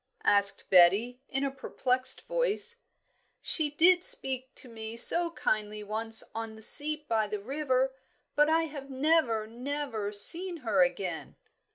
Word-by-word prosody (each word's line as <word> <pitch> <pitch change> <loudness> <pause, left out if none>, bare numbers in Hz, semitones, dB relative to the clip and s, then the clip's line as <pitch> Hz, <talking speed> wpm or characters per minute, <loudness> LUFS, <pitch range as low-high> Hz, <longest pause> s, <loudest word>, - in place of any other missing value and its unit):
asked 200 -1 +5
Betty, 200 +8 +3
in 270 +1 -3
a 275 - -2
perplexed 260 -1 0
voice. - - -2 0.6
"She 310 -3 +2
did 350 +5 +3
speak 265 - -4
to - - -14
me 225 -1 -8
so 340 +8 +4
kindly 215 -8 -3
once 225 +2 -1
on 225 0 -7
the 220 - -14
seat 300 +5 +2
by 220 -3 -1
the 210 0 -5
river; 265 +2 -2 0.4
but 295 +1 +3
I 325 +1 +2
have 285 -3 -9
never, 265 -5 0
never 240 -2 -6
seen 340 - +4
her 205 -4 +1
again." 175 -1 -3
255 Hz, 145 wpm, -28 LUFS, 215-300 Hz, 0.6 s, asked